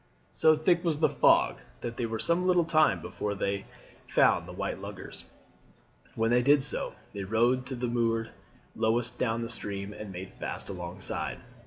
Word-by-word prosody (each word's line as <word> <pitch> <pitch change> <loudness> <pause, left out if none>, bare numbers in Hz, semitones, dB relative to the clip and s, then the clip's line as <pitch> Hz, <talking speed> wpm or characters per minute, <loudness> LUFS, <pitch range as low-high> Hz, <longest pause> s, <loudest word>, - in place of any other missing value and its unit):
So 155 0 +4
thick 170 +3 +2
was 165 -4 +1
the 155 - +4
fog - - +3 0.2
that 120 -1 -4
they 120 - -2
were 110 0 -3
some 170 +8 +1
little 180 -2 +4
time 155 -1 +3
before 105 -1 -3
they 100 0 -2 0.4
found - - +3
the - - -8
white - - -4
luggers. - - -8 0.9
When 115 +1 +1
they 125 0 +4
did 140 +2 +5
so - - +1 0.2
they 100 - -4
rowed 120 +5 +1
to 130 - -4
that 125 0 -3
moored 115 -1 0 0.4
lowest 115 +2 0
down 115 -1 0
the - - -3
stream 100 -3 -3
and 105 -1 -8
made 95 +1 -7
fast - - -5
alongside. 90 0 -4
115 Hz, 175 wpm, -29 LUFS, 105-145 Hz, 0.9 s, did